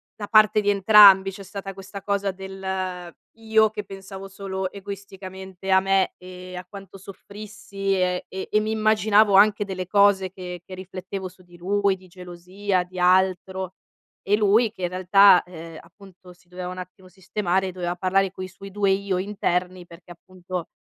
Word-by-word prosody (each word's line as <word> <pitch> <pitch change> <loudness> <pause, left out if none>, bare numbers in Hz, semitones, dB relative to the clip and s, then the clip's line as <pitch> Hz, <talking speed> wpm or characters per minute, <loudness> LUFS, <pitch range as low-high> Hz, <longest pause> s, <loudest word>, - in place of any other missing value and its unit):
da 205 - -7
parte 215 0 +5
di 205 - 0
entrambi 195 -1 +7
c'è 195 +1 -11
stata 195 0 -8
questa 195 +1 -10
cosa 200 -1 -1
del: 190 -2 -6 0.2
io 220 -1 +2
che 210 -1 -7
pensavo 195 0 -10
solo 190 -1 -5
egoisticamente 190 -1 -8
a 190 - +6
me 195 0 +1
e 180 0 -10
a 180 - -8
quanto 195 0 -12
soffrissi 200 0 -6
e 180 -1 -1
e 190 0 -7
e 215 - +3
mi 215 +1 -2
immaginavo 215 -1 +3
anche 210 +1 +5
delle 185 -3 -6
cose 200 -2 +3
che 180 -2 -8
che 185 - -11
riflettevo 185 0 -7
su 185 +1 -21
di 175 0 -19
lui, 195 +2 0
di 185 0 -18
gelosia, 180 +2 -3
di 180 0 -10
altro 185 0 +1 0.5
e 205 - +4
lui 215 +2 +3
che 190 - -13
in 175 - 0
realtà, 185 +1 +5
ehm, 165 -2 -10
appunto 180 +1 -17
si 180 0 -29
doveva 180 0 -7
un 180 0 -7
attimo 185 +1 -11
sistemare, 190 0 -2
doveva 175 -1 -4
parlare 190 +1 +1
coi 185 -1 -8
suoi 195 +2 -12
2 200 0 0
io 195 -1 -1
interni 185 -2 -2
perché 170 0 -15
appunto 180 0 -8
190 Hz, 170 wpm, -23 LUFS, 185-200 Hz, 0.5 s, entrambi